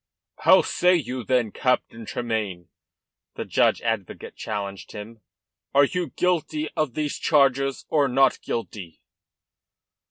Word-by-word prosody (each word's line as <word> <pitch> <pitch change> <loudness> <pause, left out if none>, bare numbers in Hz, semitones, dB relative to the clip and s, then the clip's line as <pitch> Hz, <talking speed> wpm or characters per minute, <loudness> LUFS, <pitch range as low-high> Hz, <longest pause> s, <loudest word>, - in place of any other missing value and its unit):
"How - - +6
say 180 +1 +3
you, 130 -6 -3
then, 125 -3 +1
Captain 115 -3 -1
Tremayne?" 105 -8 -3 0.7
the - - -4
judge - - +2
advocate 110 -5 -3
challenged 100 -2 -5
him. 110 +1 -9 0.5
"Are 140 +1 +7
you 175 +1 -3
guilty 155 -3 0
of 155 -6 -1
these 150 -2 -2
charges 135 -3 +2
or 145 -3 +2
not 135 +1 +3
guilty?" 100 -7 -5
125 Hz, 120 wpm, -24 LUFS, 110-150 Hz, 0.7 s, Are